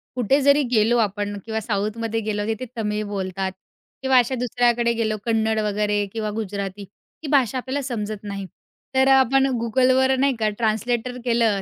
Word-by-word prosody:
कुठे 255 Hz, +3 st, +2 dB
जरी 280 Hz, +1 st, +5 dB
गेलो 230 Hz, +1 st, +3 dB
आपण 205 Hz, -1 st, -1 dB
किंवा 220 Hz, 0 st, -2 dB
साऊथमध्ये 220 Hz, +2 st, -2 dB
गेलो 210 Hz, -1 st, -2 dB
तिथं 225 Hz, +3 st, -2 dB
तमिळ 210 Hz, -1 st, -1 dB
बोलतात 190 Hz, -1 st, -3 dB, 0.5 s
किंवा 265 Hz, -1 st, +3 dB
अशा 250 Hz, +2 st, +3 dB
दुसऱ्याकडे 240 Hz, -1 st, +1 dB
गेलो 220 Hz, -2 st, -1 dB
कन्नड 220 Hz, -1 st, +1 dB
वगैरे 205 Hz, 0 st, 0 dB
किंवा 220 Hz, -2 st, -2 dB
गुजराती 200 Hz, -1 st, -4 dB, 0.4 s
ही -, -, -4 dB
भाषा 260 Hz, -4 st, +3 dB
आपल्याला 265 Hz, +3 st, -3 dB
समजत 215 Hz, -5 st, -4 dB
नाही, 200 Hz, -1 st, -5 dB, 0.5 s
तर 265 Hz, 0 st, +4 dB
अ, -, -, +5 dB
आपण 265 Hz, +1 st, +3 dB, 0.2 s
Googleवर 260 Hz, +3 st, +3 dB
नाही 275 Hz, -2 st, +2 dB
का 215 Hz, -1 st, +2 dB
ट्रान्सलेटर 235 Hz, +2 st, -1 dB
केलं 230 Hz, -4 st, +2 dB
225 Hz, 160 wpm, -22 LUFS, 210-250 Hz, 0.5 s, जरी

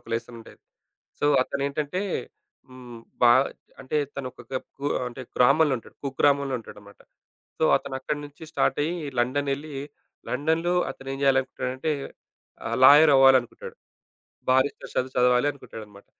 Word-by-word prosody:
ఒక -, -, -20 dB
లెస్సన్ 115 Hz, +1 st, -4 dB
ఉండేది. 115 Hz, -, -16 dB, 0.6 s
సో -, -, 0 dB, 0.2 s
అతనేంటంటే 140 Hz, +6 st, -2 dB, 0.7 s
హ్మ్ 125 Hz, -2 st, -11 dB, 0.2 s
బా 120 Hz, -1 st, +7 dB, 0.5 s
అంటే 135 Hz, +3 st, -2 dB, 0.2 s
తను 140 Hz, -2 st, -4 dB
ఒక -, -, -14 dB, 0.4 s
కుగు 145 Hz, +1 st, -2 dB, 0.5 s
గ్రామంలో 140 Hz, +4 st, +4 dB
ఉంటాడు. 115 Hz, -, -16 dB
కుగ్రామంలో 140 Hz, 0 st, +1 dB
ఉంటాడన్నమాట. 105 Hz, -2 st, -14 dB, 0.6 s
సో -, -, +1 dB
అతనక్కడినుంచి 145 Hz, +3 st, -6 dB
స్టార్ట్ 135 Hz, -, +1 dB
అయ్యి 165 Hz, +4 st, -1 dB, 0.3 s
లండన్ 140 Hz, +4 st, 0 dB
ఎళ్లి, 150 Hz, +3 st, -7 dB, 0.6 s
లండన్‍లో 160 Hz, +4 st, 0 dB, 0.2 s
అతను 135 Hz, 0 st, -11 dB
ఏం -, -, -5 dB
జేయాలనుకుంటాడంటే 130 Hz, +1 st, 0 dB, 0.8 s
ఆహ్, 115 Hz, +1 st, -2 dB
లాయర్ 145 Hz, +3 st, +8 dB
అవ్వాలనుకుంటాడు. 135 Hz, -2 st, +3 dB, 0.7 s
బారిస్టర్ 130 Hz, +2 st, +1 dB
చదువు 130 Hz, +1 st, -1 dB
చదవాలి 125 Hz, +2 st, +3 dB
అనుకుంటాడన్నమాట. 105 Hz, -7 st, -12 dB
135 Hz, 120 wpm, -25 LUFS, 125-145 Hz, 0.8 s, లాయర్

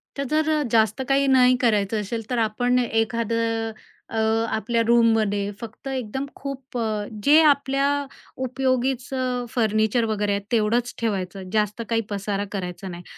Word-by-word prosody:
तर 280 Hz, -, -2 dB
जर 310 Hz, +3 st, +1 dB
अ, 305 Hz, -1 st, +2 dB
जास्त 220 Hz, +1 st, +2 dB
काही 275 Hz, 0 st, +3 dB
नाही 255 Hz, -1 st, +5 dB
करायचं 210 Hz, -2 st, +1 dB
असेल, 225 Hz, +2 st, -5 dB
तर 250 Hz, -, -1 dB
आपण 245 Hz, +3 st, +1 dB
एखादं 225 Hz, -1 st, 0 dB, 0.4 s
अ, 225 Hz, -, -2 dB, 0.4 s
आपल्या 230 Hz, +2 st, 0 dB
रूममध्ये 220 Hz, -4 st, +3 dB
फक्त 230 Hz, +4 st, -9 dB
एकदम 265 Hz, 0 st, -3 dB
खूप 270 Hz, -2 st, -7 dB
अ, 235 Hz, -, -1 dB, 0.4 s
जे 300 Hz, +3 st, +7 dB
आपल्या 280 Hz, -1 st, +3 dB, 0.6 s
उपयोगीचं 255 Hz, -1 st, -1 dB
फर्निचर 220 Hz, 0 st, +1 dB
वगैरे 210 Hz, -2 st, -1 dB
आहे, 200 Hz, -, -1 dB
तेवढंच 235 Hz, +2 st, +1 dB
ठेवायचं, 190 Hz, -4 st, -3 dB
जास्त 210 Hz, +1 st, 0 dB
काही 230 Hz, -1 st, +2 dB
पसारा 200 Hz, 0 st, -2 dB
करायचा 190 Hz, -1 st, -5 dB
नाही 175 Hz, -1 st, -8 dB
230 Hz, 140 wpm, -23 LUFS, 210-255 Hz, 0.6 s, जे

